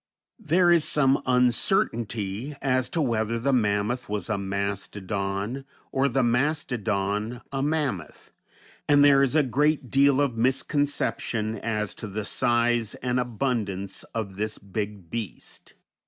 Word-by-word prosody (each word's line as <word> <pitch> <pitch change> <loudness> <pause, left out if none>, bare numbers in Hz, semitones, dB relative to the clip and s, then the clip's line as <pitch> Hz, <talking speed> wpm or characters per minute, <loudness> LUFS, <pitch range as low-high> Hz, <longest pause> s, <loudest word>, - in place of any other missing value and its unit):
There 175 -2 +3
is 170 -3 +5
some 135 -3 +3
uncertainty 120 - +1
as 130 -2 0
to 165 - -2
whether 115 -2 0
the 135 +4 0
mammoth 110 +1 0
was 105 0 -3
a 105 - +1
mastodon, 100 +3 -3 0.3
or 135 +1 +2
the 135 +1 +1
mastodon 115 -4 -1
a 135 -1 -2
mammoth, 140 - -2 0.6
and 145 -1 +6
there 140 -1 +6
is 140 +1 +2
a 155 - +5
great 140 0 +1
deal 140 0 +4
of 140 -5 +1
misconception 120 -3 0
as 105 -1 -2
to 110 - -7
the 105 +1 -4
size 120 -1 +1
and 125 0 -1
abundance 110 -6 -2
of 100 -4 -5
this 110 +1 -2
big 100 -3 -6
beast. 115 -6 -7
120 Hz, 130 wpm, -26 LUFS, 105-135 Hz, 0.6 s, and